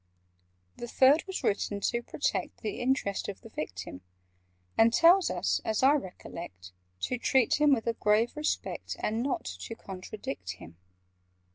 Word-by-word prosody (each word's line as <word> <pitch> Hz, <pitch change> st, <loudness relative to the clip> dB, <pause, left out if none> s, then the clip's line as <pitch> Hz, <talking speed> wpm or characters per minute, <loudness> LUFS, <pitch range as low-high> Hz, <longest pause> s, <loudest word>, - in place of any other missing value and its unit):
"The 240 Hz, -, -6 dB
Third 270 Hz, +6 st, +5 dB
was 380 Hz, -, -4 dB
written 200 Hz, 0 st, 0 dB
to 235 Hz, +4 st, 0 dB
protect -, -, -2 dB
The 410 Hz, -, -4 dB
interests 245 Hz, -6 st, 0 dB
of 200 Hz, -, -7 dB
the 225 Hz, -, -12 dB
Victim, 90 Hz, -, -6 dB, 0.7 s
And 225 Hz, +1 st, +5 dB
tells 345 Hz, +8 st, +6 dB
us, -, -, 0 dB
as 220 Hz, +3 st, -1 dB
I 270 Hz, -, +7 dB
recollect, 170 Hz, -, -6 dB, 0.3 s
To 250 Hz, -, -1 dB
treat 265 Hz, +3 st, +2 dB
him 295 Hz, -1 st, +6 dB
with 240 Hz, -5 st, +2 dB
a 230 Hz, -, +1 dB
grave 220 Hz, +3 st, +2 dB
respect, 300 Hz, 0 st, -3 dB
And 220 Hz, +2 st, -1 dB
not 265 Hz, +2 st, -2 dB
to 90 Hz, -, -6 dB
contradict 185 Hz, -, -7 dB
him." 85 Hz, -2 st, -13 dB
225 Hz, 150 wpm, -29 LUFS, 185-265 Hz, 0.7 s, I